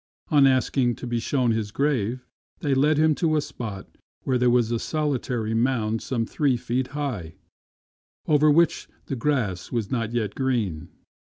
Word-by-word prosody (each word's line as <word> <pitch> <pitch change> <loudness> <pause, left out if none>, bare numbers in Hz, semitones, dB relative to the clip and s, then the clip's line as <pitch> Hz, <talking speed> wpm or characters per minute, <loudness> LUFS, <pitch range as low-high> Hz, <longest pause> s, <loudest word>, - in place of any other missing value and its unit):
On 145 -3 +6
asking 130 -2 +2
to - - -8
be 120 -1 -1
shewn 125 0 +1
his 110 -2 -1
grave, 125 -1 -1 0.4
they 145 -5 +1
led 145 +3 +3
him 155 0 +4
to 155 +1 +1
a - - +3
spot 110 -8 -7 0.4
where 130 -2 +1
there 125 0 +3
was 120 -2 +2
a 115 - 0
solitary 125 -8 -2
mound 115 -2 0
some 115 -3 -2
three 135 0 +1
feet 125 +2 -2
high, 105 - -4 0.9
over 150 0 +4
which 165 +2 +3 0.2
the 135 - -3
grass 115 - -1
was 115 -3 -2
not 115 -3 -1
yet 115 -3 -1
green. 115 - -1
125 Hz, 165 wpm, -24 LUFS, 115-140 Hz, 0.9 s, On